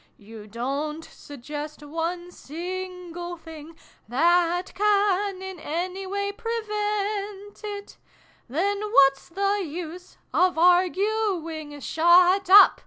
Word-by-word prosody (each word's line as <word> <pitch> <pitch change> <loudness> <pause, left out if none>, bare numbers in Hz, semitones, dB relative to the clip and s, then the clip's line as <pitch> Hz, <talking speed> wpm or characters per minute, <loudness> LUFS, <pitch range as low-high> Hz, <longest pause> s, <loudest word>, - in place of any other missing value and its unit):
You 215 0 -12
don't 280 +8 -3
suggest 295 +2 -8
one 340 +3 -4
single 350 +1 -6
thing 320 -1 -12 0.3
That 345 +7 +2
can 400 -2 +1
in 380 -2 -7
any 360 +5 -4
ivay 400 +1 -2
prevent 420 -2 -3
it 410 -1 -7 0.5
Then 400 +9 0
whafs 275 -11 +3
the 395 +3 0
use 345 +2 -8 0.2
of 365 -2 +3
arguing? 355 -3 +1
Shut 355 +5 +4
up 405 +2 +8
360 Hz, 100 wpm, -25 LUFS, 315-400 Hz, 0.5 s, up